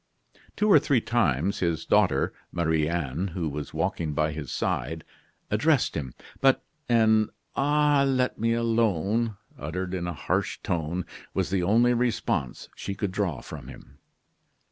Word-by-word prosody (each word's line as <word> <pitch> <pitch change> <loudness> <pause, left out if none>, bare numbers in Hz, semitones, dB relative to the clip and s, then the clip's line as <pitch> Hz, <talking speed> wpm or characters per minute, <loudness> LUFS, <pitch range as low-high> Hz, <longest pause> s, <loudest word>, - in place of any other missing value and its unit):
Two 210 - +1
or 205 - +8
three 140 -6 +2
times 100 - +1
his 85 -2 -1
daughter, - - +3 0.2
Marie 80 -3 +1
Anne, 85 +1 -2
who 85 -4 -1
was 75 0 -5
walking 80 -1 -1
by 75 +1 +1
his 75 -4 -6
side, 80 0 -2 0.5
addressed 130 +6 +2
him; 65 -6 -4 0.2
but 135 -1 +4 0.3
an 110 -2 +4 0.3
"Ah! 145 0 +3
let 130 -1 +1
me 115 +1 +2
alone!" 115 -2 +1 0.2
uttered 90 +6 -4
in 90 -2 -2
a 85 - -2
harsh - - -1
tone, 85 +1 -2 0.3
was - - 0
the 95 -2 +1
only 115 +7 +4
response 115 - -1
she 100 - -5
could 100 -1 -2
draw 95 -8 -1
from - - -9
him. 70 +3 -13
95 Hz, 145 wpm, -27 LUFS, 80-115 Hz, 0.5 s, or